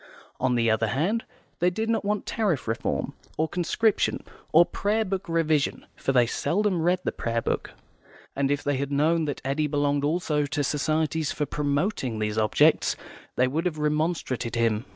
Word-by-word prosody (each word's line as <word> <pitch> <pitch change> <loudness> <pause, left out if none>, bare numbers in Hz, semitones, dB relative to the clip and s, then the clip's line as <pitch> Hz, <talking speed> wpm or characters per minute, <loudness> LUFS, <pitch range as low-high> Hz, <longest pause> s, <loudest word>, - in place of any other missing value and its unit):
On 130 -1 +1
the 115 -1 +2
other 110 0 +1
hand, 175 - 0 0.3
they 175 - +4
did 220 +5 -3
not 225 0 +1
want 210 0 -1
Tariff 200 - -1
Reform, 110 - -2 0.2
or 160 - +1
Conscription, 185 +6 +1 0.3
or 170 +2 +7
Prayer 215 +4 0
Book 190 -2 -3
Revision 160 -3 +1
(for - - -1
they 125 -2 +4
seldom 185 - 0
read 180 +2 +2
the - - 0
Prayer 115 0 -2
Book), - - -2 0.6
and 135 0 +1
if 145 0 0
they 145 -1 0
had 140 +1 -3
known 155 +3 +2
that 145 -2 -4
Eddy 145 +3 0
belonged 145 -1 +1
also 150 -1 0
to 145 +1 -1
societies 155 +2 0
for 150 - -1
promoting 145 - -1
these 105 0 -1
objects, 110 0 +3 0.4
they 125 - +3
would 160 +7 0
have 160 -3 -3
remonstrated 150 -5 -1
with - - -1
him. 110 +1 +1
150 Hz, 175 wpm, -26 LUFS, 135-175 Hz, 0.6 s, or